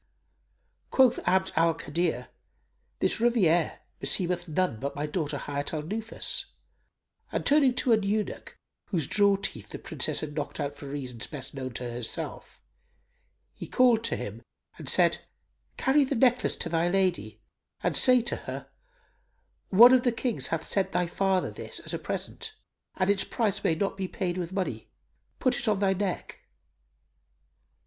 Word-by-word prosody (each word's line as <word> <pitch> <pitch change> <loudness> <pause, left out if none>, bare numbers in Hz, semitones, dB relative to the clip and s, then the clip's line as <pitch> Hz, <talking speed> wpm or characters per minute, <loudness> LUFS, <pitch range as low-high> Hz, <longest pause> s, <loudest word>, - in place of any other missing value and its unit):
Quoth 260 -2 +4
Abd 190 0 +2
al 165 0 +3
Kadir, 165 -6 -2 0.7
"This - - 0
rivière 190 -9 +3 0.2
beseemeth 180 -1 -1
none 165 -6 0
but 140 +3 -4
my 145 +1 -2
daughter 150 -1 -2
Hayat 145 +2 -3
al 150 - -3
Nufus;" 220 +7 -1 0.9
and, - - -2
turning 280 -3 +4
to 245 -1 +3
an 220 - +3
eunuch, 205 +1 -2 0.3
whose 165 -7 -1
jaw 200 +3 +3
teeth 110 - -4
the - - -6
Princess - - 0
had 150 -1 -5
knocked 145 -1 -4
out 140 - -2
for 140 - -10
reasons 130 -5 -5
best 135 -4 -7
known 130 -3 -6
to 125 - -4
herself,[FN#296] 120 -1 -6 0.9
he - - -8
called 245 -3 +4
to 230 - 0
him - - -6 0.4
and - - -4
said, - - +4 0.6
"Carry 280 +2 +4
the 275 +1 -1
necklace 250 +1 +3
to - - -3
thy 165 +1 +1
lady 185 -1 0 0.4
and - - 0
say 250 -2 +6
to 240 - -1
her, - - -6 1.0
'One 235 +6 +9
of 255 - +6
the 245 - +2
Kings 235 0 -1
hath 160 -1 -2
sent 190 -1 0
thy 180 - +2
father 190 +1 0
this, - - -5
as - - -4
a - - -2
present, 445 -2 -5 0.4
and 185 - +1
its 200 - +2
price 210 -4 -1
may 160 - +2
not 195 +3 -2
be 190 -1 -2
paid 185 -1 -3
with 175 -1 -4
money; 190 -1 -3 0.5
put 255 - +1
it - - -5
on 210 -2 +3
thy 195 -1 +2
neck. 190 -1 -3
185 Hz, 160 wpm, -28 LUFS, 160-225 Hz, 1.0 s, One